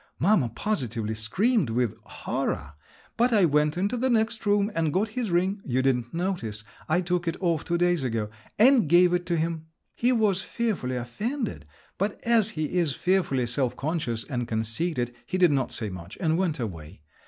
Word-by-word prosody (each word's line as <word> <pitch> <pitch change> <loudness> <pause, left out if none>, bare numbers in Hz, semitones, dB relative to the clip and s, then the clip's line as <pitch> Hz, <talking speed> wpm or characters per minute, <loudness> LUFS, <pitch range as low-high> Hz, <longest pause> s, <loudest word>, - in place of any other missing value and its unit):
Mamma 175 - +3
positively 115 - -2
screamed 180 - +1
with 120 -1 0
horror, 70 +1 -3 0.4
but 245 +2 +3
I 205 -5 +5
went 150 0 +2
into 200 +7 0
the 260 +2 +1
next 220 -2 0
room 205 +1 +3
and 160 -2 0
got 205 +7 +1
his 230 0 -3
ring—you 175 - 0
didn't 125 -3 +1
notice, 165 - -3 0.3
I 175 +3 +3
took 175 -1 -1
it 165 - -1
off 170 -5 0
two 170 -1 0
days 175 -3 +2
ago—and 125 - +2
gave 175 +1 +6
it 175 0 0
to 170 -1 +1
him. 160 0 -2 0.3
He 245 +2 +1
was 210 -6 +2
fearfully 195 - -2
offended, 200 - -4 0.3
but 200 +2 -1
as 230 -3 +3
he 155 +3 0
is 160 -6 +1
fearfully 180 -9 +1
self 125 +1 0
conscious 135 -7 -2
and 125 -3 -3
conceited, 120 +4 -2
he 185 - -1
did 180 -3 +5
not 135 -3 0
say 110 -4 -3
much, 90 +1 -9
and 160 -3 +1
went 170 -4 0
away. 85 -7 -6
165 Hz, 175 wpm, -26 LUFS, 120-195 Hz, 0.4 s, gave